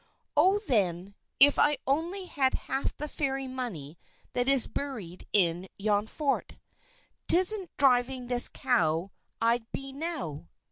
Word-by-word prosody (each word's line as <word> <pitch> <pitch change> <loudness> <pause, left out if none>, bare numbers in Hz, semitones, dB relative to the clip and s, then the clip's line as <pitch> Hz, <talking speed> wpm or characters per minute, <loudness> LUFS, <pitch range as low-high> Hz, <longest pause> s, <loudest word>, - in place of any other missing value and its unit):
"Oh, 370 +7 +4
then, 195 -5 0 0.3
if 285 +2 +7 0.3
only 330 +8 -1
I - - -8
had 275 -7 0
half 270 - -4
the 300 - -4
Fairy 270 -2 -3
money 190 - -6 0.3
that 245 +1 -1
is 270 -3 +4
buried 215 -12 -7
in 180 -2 +1
yon 205 +1 0
fort, 280 +3 -2 0.7
'tisn't 370 +2 +4
driving 255 -1 +2
this 245 0 +5
cow 175 -8 0 0.3
I'd 230 0 0
be 270 0 -6
now!" 280 - -5
255 Hz, 130 wpm, -28 LUFS, 200-285 Hz, 0.7 s, if